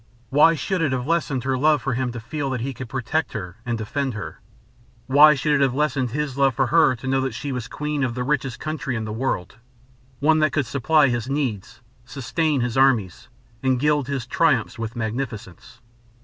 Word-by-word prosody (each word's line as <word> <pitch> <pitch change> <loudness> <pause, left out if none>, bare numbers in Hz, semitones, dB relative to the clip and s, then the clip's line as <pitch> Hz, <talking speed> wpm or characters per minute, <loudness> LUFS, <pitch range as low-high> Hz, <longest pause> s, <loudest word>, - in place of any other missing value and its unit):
Why 150 +4 +5
should 185 +3 -2
it 145 -5 +1
have 125 -1 -2
lessened 150 -5 0
her 130 0 0
love 150 +1 +3
for 135 - -1
him 125 0 -1
to 120 - -5
feel 140 +5 -4
that 130 -3 -3
he 135 +3 -3
could 125 0 -8
protect 135 +5 -2
her 95 -4 -6
and 120 -1 -1
defend 130 +3 -3
her? 105 - -7 0.7
Why 150 +3 +7
should 150 +2 0
it 145 - +2
have 135 -2 +2
lessened 140 -3 0
his 140 +1 -3
love 135 -3 +3
for 135 - +2
her 155 -1 +4
to 125 - -11
know 135 0 +1
that 130 -4 -3
she 140 +3 -4
was 125 -3 -4
queen 150 -1 -3
of 120 -3 -1
the 125 - -2
richest 135 -2 -1
country 155 -4 -3
in 110 -1 -3
the 105 - -5
world 110 -7 -3 0.6
one 155 +2 +3
that 155 -1 +2
could 145 -3 +1
supply 140 +3 +3
his 120 +1 -2
needs, 130 -7 -3 0.2
sustain 135 +4 -1
his 120 0 -2
armies, 120 -9 +2 0.3
and 130 -2 +1
gild 150 -1 +1
his 135 -4 -3
triumphs - - +1
with 115 +1 -4
magnificence? 115 -1 -5
130 Hz, 205 wpm, -23 LUFS, 120-150 Hz, 0.7 s, Why